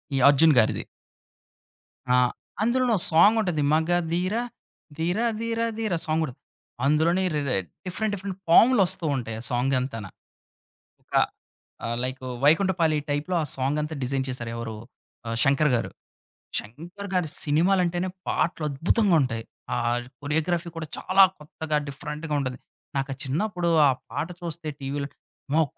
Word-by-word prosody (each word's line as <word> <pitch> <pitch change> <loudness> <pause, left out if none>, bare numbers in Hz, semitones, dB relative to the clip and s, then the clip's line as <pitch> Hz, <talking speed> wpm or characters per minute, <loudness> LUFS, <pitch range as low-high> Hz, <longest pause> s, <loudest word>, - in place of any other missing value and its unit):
ఈ - - +1
'అర్జున్' 150 +1 +6
గారిది. 110 - +1 1.3
ఆ! - - +5 0.5
అందులోను 245 +1 +2
ఓ - - -1
సాంగుంటది 180 -1 +4
మగధీర 175 +4 +1 0.6
ధీర 175 +6 0 0.2
ధీర 230 0 -2 0.2
ధీర 215 -4 -1
సాంగుంటది. 155 -4 -1 0.5
అందులోనే 165 +6 +3
రే 140 -4 0 0.3
డిఫరెంట్ 205 +3 -2
డిఫరెంట్ 195 -1 -6
పాములొస్తూ 195 -4 +5
ఉంటాయి 115 -4 -4
ఆ - - -11
సాంగ్ 125 +3 +1
అంతాన. 115 -5 -4 1.8
ఆహ్, 115 +1 -2
లైకు 130 0 -5 0.2
వైకుంఠపాళీ 165 -1 +3
టైప్‌లో 145 +5 -1
ఆ - - -1
సాంగంతా 150 +4 -1
డిజైన్ 130 +1 -1
చేశారు. 120 -3 -4
ఎవరు 115 -1 -5 0.5
ఆ - - -2
'శంకర్' 140 +1 +3
గారు. 115 - -1 0.7
'శంకర్' 175 - -7
గారి 180 -4 +1
సినిమాలంటేనే 175 +3 +2 0.2
పాటలద్భుతంగా 165 +5 +1
ఉంటాయి. 115 -3 -2 0.3
ఆ - - 0 0.4
కొరియోగ్రఫీ 165 +4 -1
కూడా 160 -1 -4
చాలా 195 +1 +5 0.2
కొత్తగా 150 0 -3
డిఫరెంట్‌గా 150 +3 -5
ఉంటది. 130 -2 -3 0.4
నాకా 135 0 -1
చిన్నప్పుడు 175 +5 -1 0.2
ఆ - - +5 0.2
పాట 145 +3 -2
చూస్తే 170 -2 -5
టీవీలో 140 +1 -3 0.4
అమ్మో! 160 +3 +4
160 Hz, 120 wpm, -25 LUFS, 135-180 Hz, 1.8 s, అర్జున్